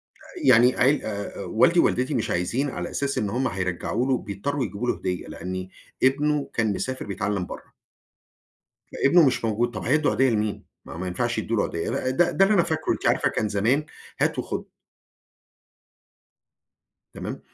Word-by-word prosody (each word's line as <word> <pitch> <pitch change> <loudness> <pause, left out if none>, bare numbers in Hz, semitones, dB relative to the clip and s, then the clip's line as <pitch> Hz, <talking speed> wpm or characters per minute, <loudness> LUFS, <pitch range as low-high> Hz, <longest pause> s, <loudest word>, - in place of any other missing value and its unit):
آآ 345 -6 -7
يعني 125 +2 +6
عيل 135 +4 +3
آآ 100 -1 -5
والدي - - +3
ووالدتي 130 +4 +2
مش 120 -5 -1
عايزين 115 +11 0
على - - -5
أساس 140 -1 -2
إن 105 - 0
هم 130 +6 0
هيرجَّعوا 95 +3 -2
له 135 - +2
وبيضطرّوا 130 +5 -2
يجيبوا 105 +4 -4
له - - +1
هدية، 90 -1 -3
لأني 95 +1 -6 0.3
ابنه 145 +2 +2
كان 110 -3 +1
مسافر 130 +6 -4
بيتعلم 100 -1 -2
برَّه. - - -10 1.2
فابْنُه 165 +4 +5
مش 125 -2 0
موجود 115 +2 0
طب 105 - -5
هيدّوا 150 +4 +2
عيديّة 135 0 +3
لمين؟ 105 -2 -1 0.2
ما - - -8
ما 90 +2 -4
ينفعش 120 +7 -1
يدوا 110 +1 -1
له - - +3
عيديّة 85 +9 -2
ده 175 +6 +2
ده 195 - +4
اللي 205 - +3
أنا 175 - +5
فاكره، 160 -2 -1
أنتِ - - -2
عارفة - - +3
كان 105 - -1
زمان 115 +9 +1 0.4
هات - - +1
وخد. - - -4 2.5
تمام؟ - - -6
120 Hz, 170 wpm, -25 LUFS, 100-140 Hz, 2.5 s, يعني